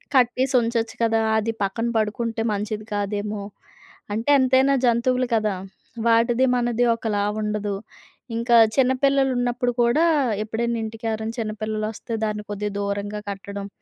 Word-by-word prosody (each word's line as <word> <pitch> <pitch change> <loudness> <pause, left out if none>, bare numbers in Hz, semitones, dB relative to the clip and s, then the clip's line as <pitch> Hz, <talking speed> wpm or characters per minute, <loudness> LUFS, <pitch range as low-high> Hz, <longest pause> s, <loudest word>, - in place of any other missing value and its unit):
కట్టేసి 255 +1 +3
ఉంచొచ్చు 230 -1 -1
కదా! 225 0 +2 0.2
అది 220 +1 0
పక్కన 225 +4 -1
పడుకుంటే, 225 +1 -1
మంచిది 210 +1 -3
కాదేమో. 205 0 -2 0.7
అంటే 225 +6 -2
ఎంతైనా 260 +1 +4
జంతువులు 250 +2 +2
కదా! 215 -2 +1 0.5
వాటిది 235 +2 +4
మనది 240 0 +1
ఒకలా 210 -3 -1 0.2
ఉండదు. 210 -1 -2 0.6
ఇంకా 235 +1 +2 0.2
చిన్నపిల్లలున్నప్పుడు 255 -2 +2
కూడా 240 +8 +3 0.4
ఎప్పుడైనా 235 +2 -2
ఇంటికెవరైనా 220 0 -4
చిన్న 215 -1 -2
పిల్లలొస్తే, 215 +2 -4
దాన్ని 210 -1 -3
కొద్దిగా 205 0 -3
దూరంగా 200 +1 -3
కట్టడం. 200 0 -6
225 Hz, 115 wpm, -23 LUFS, 210-245 Hz, 0.7 s, ఎంతైనా